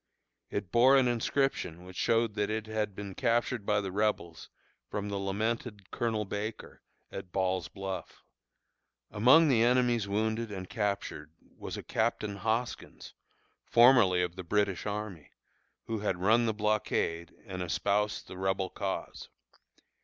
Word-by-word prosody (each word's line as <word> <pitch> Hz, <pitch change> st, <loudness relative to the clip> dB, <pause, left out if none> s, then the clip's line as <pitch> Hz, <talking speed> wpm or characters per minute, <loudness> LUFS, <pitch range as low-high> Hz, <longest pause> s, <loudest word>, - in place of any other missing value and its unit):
It 100 Hz, -3 st, -4 dB
bore 130 Hz, +3 st, +6 dB
an 130 Hz, -2 st, +4 dB
inscription 120 Hz, -, -1 dB
which 95 Hz, 0 st, -11 dB
showed 115 Hz, +1 st, +2 dB
that 105 Hz, 0 st, -1 dB
it 110 Hz, 0 st, -2 dB
had 110 Hz, -2 st, -2 dB
been 100 Hz, -1 st, -6 dB
captured 115 Hz, -1 st, 0 dB
by 105 Hz, -1 st, +2 dB
the 95 Hz, -1 st, -4 dB
Rebels 95 Hz, -5 st, -1 dB, 0.4 s
from 105 Hz, 0 st, -3 dB
the 100 Hz, -, -2 dB
lamented 105 Hz, +1 st, -3 dB
Colonel 110 Hz, -2 st, -1 dB
Baker, 105 Hz, +3 st, -6 dB, 0.3 s
at 95 Hz, -2 st, -7 dB
Ball's 95 Hz, -2 st, 0 dB
Bluff. 95 Hz, -1 st, -7 dB, 0.9 s
Among 130 Hz, +10 st, +6 dB
the 125 Hz, -6 st, +4 dB
enemy's 120 Hz, -3 st, +3 dB
wounded 110 Hz, +2 st, -1 dB
and 95 Hz, -2 st, -6 dB
captured 100 Hz, -8 st, -3 dB, 0.2 s
was -, -, -6 dB
a -, -, -7 dB
Captain 110 Hz, -3 st, -1 dB
Hoskins, 110 Hz, +4 st, -3 dB, 0.5 s
formerly 115 Hz, -7 st, +5 dB
of 90 Hz, -1 st, -3 dB
the 95 Hz, -, -6 dB
British 100 Hz, +1 st, 0 dB
army, 105 Hz, -6 st, -5 dB, 0.6 s
who 115 Hz, -1 st, -3 dB
had 100 Hz, -3 st, -1 dB
run 115 Hz, +6 st, +3 dB
the 110 Hz, -, +1 dB
blockade 105 Hz, -5 st, -1 dB
and 95 Hz, -3 st, -6 dB
espoused 100 Hz, +5 st, 0 dB
the 95 Hz, -, -9 dB
Rebel 95 Hz, 0 st, -1 dB
cause. 100 Hz, -1 st, -4 dB
105 Hz, 140 wpm, -30 LUFS, 95-115 Hz, 0.9 s, bore